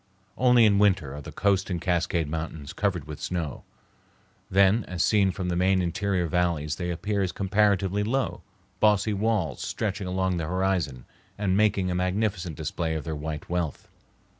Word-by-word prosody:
Only 125 -2 +5
in 100 -2 +4
winter 95 -9 +2
are 75 - -7
the - - -9
Coast 100 -1 +1
and 90 -2 -1
Cascade 85 -2 0
Mountains 80 -1 -5
covered 95 -7 -1
with 75 -1 -8
snow. 85 -6 -3 0.9
Then 100 +4 +4
as 90 -2 -1
seen 100 -3 +3
from 90 -1 -3
the 90 - 0
main 95 +2 +3
interior 90 +1 0
valleys 85 -3 0
they 90 - -3
appear 100 +4 -1
as 95 -2 0
comparatively 100 0 +1
low, 130 +4 -1 0.4
bossy 105 0 +3
walls 100 - 0
stretching 100 -2 -3
along 95 0 0
the 80 -2 -2
horizon 90 -8 -1 0.3
and 100 -3 +1
making 100 -3 +2
a - - -1
magnificent 90 -2 -1
display 80 -1 -2
of 80 - -3
their 80 -1 -4
white 75 0 -5
wealth. 85 -4 -3
90 Hz, 165 wpm, -26 LUFS, 85-100 Hz, 0.9 s, Only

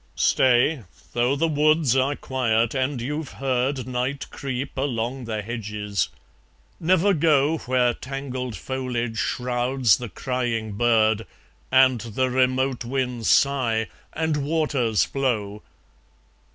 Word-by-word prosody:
Stay! 130 +3 +3 0.3
though 120 +3 +2
the 165 +4 +1
woods 155 -3 +3
are 135 +2 +2
quiet, 115 -5 0
and 130 0 -1
you've 150 +4 -4
heard 130 -1 -1
Night 130 +3 -2
creep 135 0 -4
along 130 -1 -2
the 110 -2 -3
hedges. 105 -5 -3 0.7
Never 185 +4 +3
go 155 -1 +3
Where 125 -1 +1
tangled 130 -2 -5
foliage 120 -3 -3
shrouds 125 -2 +1
the 120 -2 -6
crying 120 -1 -2
bird, 110 0 +2 0.4
And 130 -3 +5
the 120 +3 -1
remote 130 0 +1
winds 125 -2 -2
sigh, 120 -6 +2 0.2
and 160 -1 -1
waters 140 -7 +1
flow! 105 -7 -2
130 Hz, 110 wpm, -24 LUFS, 115-140 Hz, 0.7 s, And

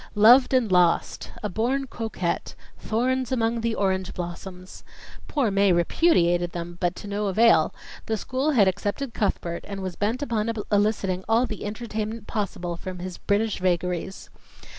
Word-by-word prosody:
"Loved 240 +5 +7
and 250 -6 +2
Lost," 180 -2 +2
"A - - 0
Born 245 +7 -1
Coquette," 220 -8 -3 0.2
"Thorns 255 +3 -1
among 230 -2 0
the 230 -1 -1
Orange 190 -1 -1
Blossoms." 180 +1 -7 0.4
Poor 265 -8 0
Mae 195 0 +3
repudiated 175 - +2
them, 175 0 -6
but 175 0 +1
to - - -9
no 205 +1 -2
avail; 225 +4 +4 0.4
the 220 -1 0
school 260 +7 -1
had 225 -10 +4
accepted 210 +7 -2
Cuthbert 170 -4 -2
and 195 -1 -5
was 185 -2 -4
bent 225 +7 -1
upon 230 -4 -1 0.2
eliciting 205 -3 +1
all 230 +3 +4
the 215 -4 -6
entertainment 220 0 -4
possible 180 -6 -3
from 185 +1 -7
his 180 0 -7
British 210 +1 0
vagaries. 180 +1 -2
205 Hz, 150 wpm, -25 LUFS, 180-230 Hz, 0.4 s, Loved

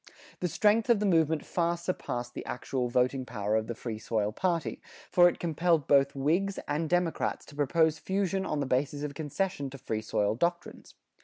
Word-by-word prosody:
The 180 - 0
strength 215 +6 +2
of 235 -3 +5
the 210 - 0
movement 160 -4 +2
far 170 0 0
surpassed 125 -8 -4
the - - -6
actual 125 0 -2
voting 130 +2 +1
power 105 -4 -2
of 110 0 0
the 120 - -4
Free 115 -2 -5
Soil 110 -2 -1
party, 170 - -1 0.3
for 175 -1 +7
it - - -6
compelled 165 -2 +1
both 140 -1 +4
Whigs 170 +9 +1
and 155 +1 -1
Democrats 175 -2 0
to 145 - -14
propose 155 +2 +2
fusion 195 +1 -1
on 150 -5 -2
the - - 0
basis 140 +3 -1
of 145 -1 -3
concession 150 0 -2
to 135 - -9
Free 110 -4 -3
Soil 105 -1 0
doctrines. 170 +8 -3
150 Hz, 185 wpm, -29 LUFS, 125-175 Hz, 0.3 s, for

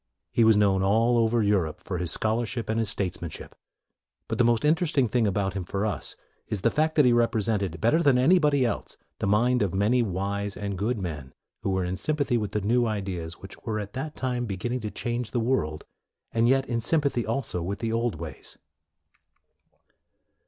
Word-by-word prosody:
He 115 - +4
was 110 -1 +6
known 100 -2 +3
all 115 +5 +3
over 115 0 +2
Europe 95 -7 +1
for 90 -3 -4
his 90 -1 -2
scholarship 115 +4 -1
and 110 +1 +1
his 110 -3 0
statesmanship. 90 -5 -4 0.7
But - - -3
the - - +6
most 120 +2 +2
in 150 - +6
teresting 155 - 0
thing 120 -3 +2
about 95 -1 0
him 95 -2 -3
for 100 +4 -2
us 105 - -3 0.3
is 105 - -3
the 115 - +3
fact 155 +1 +1
that 150 - +5
he 125 - +5
represented, 105 -6 +1
better 120 - +3
than 140 -6 +4
any 170 +9 +5
body 145 -4 +3
else, 115 - -3 0.2
the - - -1
mind 120 +5 +3
of 95 -3 0
many 110 +6 +3
wise 100 0 -2
and 100 -1 -3
good 110 +6 -1
men 75 -9 -6 0.3
who - - -2
were 95 -1 0
in 90 +1 -3
sympathy 140 +2 0
with 105 -2 -4
the 105 - 0
new 120 +4 +2
ideas 95 -6 -3
which 95 - -12
were 110 -2 -3
at 105 -1 -6
that 150 +4 -5
time 125 -2 -2
beginning 110 +6 -3
to 110 -2 -4
change 120 +2 -3
the 120 - -1
world, 115 -11 -1 0.5
and 115 +1 +2
yet 135 0 +3
in 115 -1 -1
sympathy 140 -2 +1
also 110 -6 -2
with 95 +4 -3
the 115 -1 -2
old 115 -2 0
ways. 80 0 -8
110 Hz, 200 wpm, -26 LUFS, 100-120 Hz, 0.7 s, was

